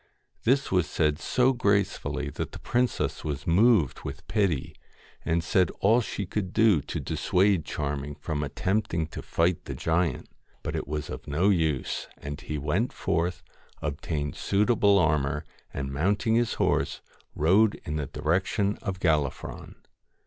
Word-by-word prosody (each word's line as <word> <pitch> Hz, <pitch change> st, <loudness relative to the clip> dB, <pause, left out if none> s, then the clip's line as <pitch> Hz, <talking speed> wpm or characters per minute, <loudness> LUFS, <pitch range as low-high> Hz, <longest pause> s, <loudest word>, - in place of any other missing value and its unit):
This 135 Hz, +3 st, +2 dB
was 90 Hz, -3 st, +2 dB
said 75 Hz, -1 st, +1 dB
so 130 Hz, +6 st, +2 dB
gracefully 100 Hz, -, 0 dB
that -, -, -5 dB
the -, -, -7 dB
princess 125 Hz, 0 st, 0 dB
was 75 Hz, -2 st, -4 dB
moved 95 Hz, -, +4 dB
with -, -, -7 dB
pity, 95 Hz, -, 0 dB, 0.5 s
and 80 Hz, +1 st, 0 dB
said 90 Hz, 0 st, +3 dB
all 115 Hz, +5 st, +4 dB
she 100 Hz, -2 st, -4 dB
could 95 Hz, 0 st, -3 dB
to 110 Hz, -8 st, +5 dB, 0.2 s
dissuade 95 Hz, -3 st, +1 dB
Charming 70 Hz, -1 st, -3 dB
from 75 Hz, 0 st, -3 dB
attempting 85 Hz, +3 st, -1 dB
to -, -, -7 dB
fight 85 Hz, +1 st, 0 dB
the -, -, -5 dB
giant. 80 Hz, -3 st, 0 dB, 0.4 s
But -, -, -3 dB
it -, -, -3 dB
was 75 Hz, 0 st, -4 dB
of -, -, -7 dB
no 80 Hz, +7 st, +2 dB
use, 80 Hz, -8 st, 0 dB, 0.3 s
he 75 Hz, -, -4 dB
went 85 Hz, -, 0 dB
forth, 85 Hz, +1 st, -1 dB, 0.4 s
obtained 75 Hz, 0 st, -3 dB
suitable 100 Hz, 0 st, +3 dB
armour, 75 Hz, -4 st, +1 dB, 0.3 s
and 70 Hz, 0 st, -4 dB
mounting 100 Hz, -, +1 dB
his 120 Hz, 0 st, +2 dB
horse -, -, 0 dB, 0.3 s
rode 100 Hz, +8 st, +4 dB
in 75 Hz, -, -2 dB
the 75 Hz, -3 st, -3 dB
direction 95 Hz, +7 st, 0 dB
of 95 Hz, -2 st, -4 dB
Gallifron. 75 Hz, -7 st, -1 dB
85 Hz, 140 wpm, -27 LUFS, 75-100 Hz, 0.5 s, to